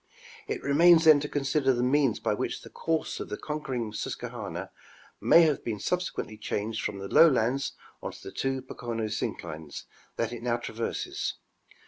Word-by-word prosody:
It - - -3
remains 165 +4 +6
then 155 -2 +8
to 145 +1 -4
consider 135 -1 +1
the 120 0 0
means 135 -2 +3
by - - 0
which - - -3
the - - -12
course 165 -1 -2
of - - -6
the 105 - -4
conquering 130 -8 -4
Susquehanna 110 - -5 0.5
may 170 - +7
have 155 -3 +1
been 110 -3 -2
subse 180 - -1
quently 110 0 -6
changed 110 +1 -2
from 100 - -2
the 100 0 -6
lowlands 135 -1 +4 0.3
on - - -4
to - - -13
the - - -7
two 135 -1 -2
Pocono 120 -3 -4
synclines 80 -8 -5 0.3
that 115 0 -1
it 120 - -6
now 120 0 0
traverses. 115 -1 -3
125 Hz, 170 wpm, -28 LUFS, 110-150 Hz, 0.5 s, then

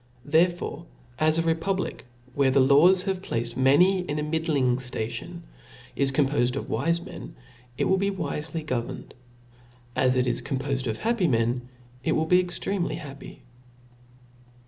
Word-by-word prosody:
Therefore, 170 0 +1 0.3
as 155 +1 +3
a 165 - +2
republic, 165 0 -2 0.3
where 140 -1 +3
the 135 +1 +3
laws 150 +8 +5
have 190 -1 -2
placed 115 -8 -3
many 155 +9 +4
in 155 -5 -3
a 150 - -1
middling, 150 -5 +1
ftation, 125 +7 -5 0.5
is 140 -1 +1
compofed 135 -3 +1
of 140 - -5
wife 170 +1 0
men, - - -9 0.4
it - - +1
will 190 - +3
be 200 +1 +1
wifely 160 -4 -4
go 130 -5 -1
verned; - - -9 0.8
as 130 0 +2
it 125 - +2
is 125 0 -1
compo&d 135 -1 -2
of 110 - -2
happy 225 -5 +1
men, 120 -1 0 0.3
it 160 - +1
wiU 160 0 0
be 180 +2 +5
extremely 180 +1 -2
happy. 140 -4 -10
150 Hz, 150 wpm, -26 LUFS, 130-175 Hz, 0.8 s, laws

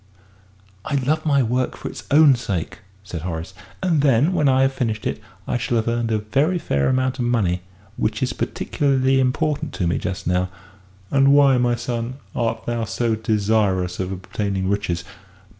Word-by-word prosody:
"I 145 - -2
love 150 +4 0
my 140 -3 +4
work 125 +2 -1
for - - -6
its - - -8
own 145 -1 +7
sake," 115 -9 -3 0.2
said 90 -4 -6
Horace, 80 0 -5 0.3
"and 165 -6 +2
then, 140 +5 +3
when 150 -6 +3
I 130 0 +4
have 135 0 +2
finished 110 -5 -2
it, - - -2 0.3
I 120 - 0
shall 120 - -1
have 110 - 0
earned 115 0 0
a 110 - +2
very 140 - +1
fair 70 - 0
amount 130 0 0
of 120 - 0
money 100 -7 +1 0.4
which 110 +2 -1
is 130 - -1
particularly 135 -2 +1
important 150 +3 0
to 90 - -1
me 85 - 0
just 95 +2 -4
now." 90 +1 +1 0.6
"And 135 0 +5
why, 140 -3 +5
my 120 -1 +2
son, 120 +1 -3 0.2
art 115 -2 -1
thou 120 -1 -1
so 115 +1 -1
desirous 105 -4 +1
of 95 0 -2
obtaining 95 +1 -2
riches?" 95 -4 -1
120 Hz, 175 wpm, -22 LUFS, 100-135 Hz, 0.6 s, own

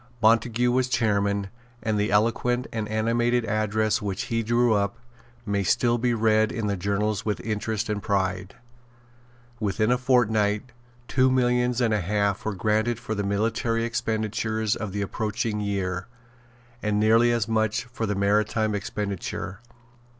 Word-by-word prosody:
Montague 115 +2 +3
was 130 0 +1
chairman; 100 -4 0 0.3
and 110 -2 0
the 105 - +1
eloquent 115 +4 +1
and 110 -2 -3
animated 120 +2 +1
address 110 +1 0
which 100 -2 -3
he 115 - +2
drew 120 +1 +2
up 100 +1 0 0.5
may 100 -1 0
still 120 +4 +2
be 120 0 +1
read 110 0 +3
in 115 -4 -3
the 100 -1 0
journals 100 +2 -1
with 105 -2 -2
interest 110 0 -2
and 105 -2 -2
pride. 95 -1 -1 1.0
Within 110 +2 +1
a 125 - +2
fortnight 110 -3 +2 0.4
two 130 0 +3
millions 125 -1 +2
and 115 -2 +2
a 105 - +1
half 100 +2 0
were 110 -2 -2
granted 110 +4 +1
for 120 -2 -5
the 100 -1 -2
military 115 +3 0
expenditure 110 -1 -2
of 110 -2 -4
the 100 +1 -2
approaching 105 +1 -2
year, 95 -3 -2 0.7
and 105 -1 0
nearly 115 +3 +4
as 115 -2 0
much 110 -1 0
for 120 -2 -4
the 105 - -1
maritime 105 +2 +1
expenditure. 100 -1 -4
110 Hz, 150 wpm, -25 LUFS, 100-115 Hz, 1.0 s, nearly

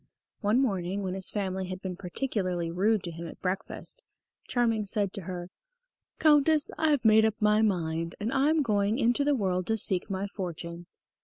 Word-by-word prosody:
One 215 +3 +2
morning, 195 -5 -1
when 185 -1 -2
his 190 0 -2
family 190 -2 -2
had 185 0 -5
been 185 -1 -5
particularly 180 -3 -2
rude 205 +4 +1
to 170 - -5
him 170 +1 -7
at - - -11
breakfast, 190 - -4 0.5
Charming 230 -4 +1
said 200 -2 +1
to 200 - -3
her: 180 0 -6 0.7
"Countess, 300 0 +4
I 315 - +1
have 285 -6 +1
made 220 0 +6
up 220 -1 +2
my 210 0 +4
mind, 165 -5 0
and 220 +5 -2
I 275 +2 +3
am 315 -1 +3
going 205 -1 +1
into 245 +2 +2
the 290 0 +2
world 185 -5 -1
to 225 - +1
seek 190 -2 +1
my 195 0 -2
fortune." 175 -3 -6
200 Hz, 185 wpm, -28 LUFS, 180-230 Hz, 0.7 s, made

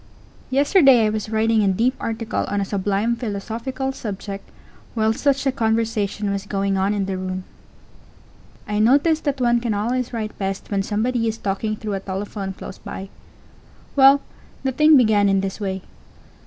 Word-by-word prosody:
Yesterday 270 - +5
I 215 - +1
was 215 0 -3
writing 220 0 +2
a - - +2
deep 225 +7 +2
article 225 0 -2
on 205 - -1
a 200 - 0
sublime 200 +4 0
philosophical 235 +4 -4
subject 200 -5 -6 0.5
while 220 -1 +2
such 275 +3 +1
a 270 - +3
conversation 220 -4 0
was 200 0 -3
going 195 -1 0
on 195 +2 +1
in 200 -1 0
the 190 -1 -3
room. 185 0 -4 1.2
I 210 0 -1
notice 285 +8 +4
that 285 -3 -2
one 240 -1 +3
can 230 -3 -1
always 240 +4 -1
write 220 -3 -5
best 195 0 -4
when 200 -1 +1
somebody 230 +4 0
is 220 0 -2
talking 210 +2 -2
through 210 -1 -5
a 195 - -1
telephone 195 0 -5
close 190 - -9
by. 190 0 -7 0.9
Well, 275 0 +7 0.4
the 265 - +1
thing 305 +3 +6
began 215 -5 +4
in 195 0 +2
this 195 +1 -4
way. 190 -2 -3
215 Hz, 170 wpm, -22 LUFS, 200-245 Hz, 1.2 s, Well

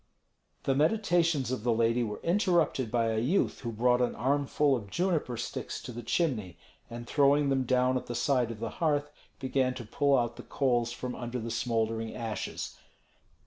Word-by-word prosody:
The 135 - +2
meditations 165 - +2
of 130 - -2
the 120 - +2
lady 115 +1 +2
were 105 -2 -4
interrupted 170 - +2
by 115 -1 +1
a 110 - 0
youth 145 - +1
who 120 - -4
brought 125 +3 +2
an 125 - 0
armful 140 +3 +2
of 105 -5 -6
juniper 165 - 0
sticks 115 - -4
to - - -6
the 120 0 -6
chimney, 115 - -1 0.3
and 120 0 -7
throwing 140 +2 +3
them 135 -1 +1
down 130 +1 +2
at - - -6
the 120 - -4
side 125 -2 +1
of 115 -2 -7
the 115 0 -3
hearth, 145 -2 +1 0.3
began 130 -1 0
to 120 - -7
pull 140 +5 +2
out 120 -1 -1
the - - -7
coals 120 -4 0
from 125 +1 -5
under 120 +1 -5
the 115 -1 -4
smouldering 115 -1 -1
ashes. 115 -2 -5
125 Hz, 185 wpm, -30 LUFS, 115-145 Hz, 0.3 s, throwing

